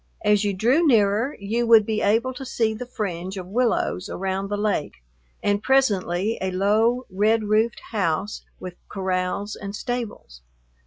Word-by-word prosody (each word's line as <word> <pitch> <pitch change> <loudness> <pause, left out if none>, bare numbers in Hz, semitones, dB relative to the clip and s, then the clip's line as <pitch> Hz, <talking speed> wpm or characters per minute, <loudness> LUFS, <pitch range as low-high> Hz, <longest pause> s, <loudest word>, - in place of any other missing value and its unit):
As 210 0 +4
you 205 - +1
drew 245 - +2
nearer 225 +2 +2
you 225 +4 -1
would 225 -2 +7
be 215 0 -1
able 230 +5 +2
to 270 - -8
see 230 -4 0
the 240 +3 -7
fringe 190 -5 -4
of 185 - -5
willows 220 -2 0
around 190 +1 -2
the 205 - -1
lake, 205 -7 -1 0.5
and 205 0 +1
presently 215 -6 +1
a 190 - 0
low, 215 +7 +2
red 215 +4 +2
roofed 215 +2 +1
house 200 -1 -1 0.2
with 180 -1 -8
corrals 190 +2 -2
and 200 0 -7
stables. 225 - -5
210 Hz, 155 wpm, -23 LUFS, 190-230 Hz, 0.5 s, would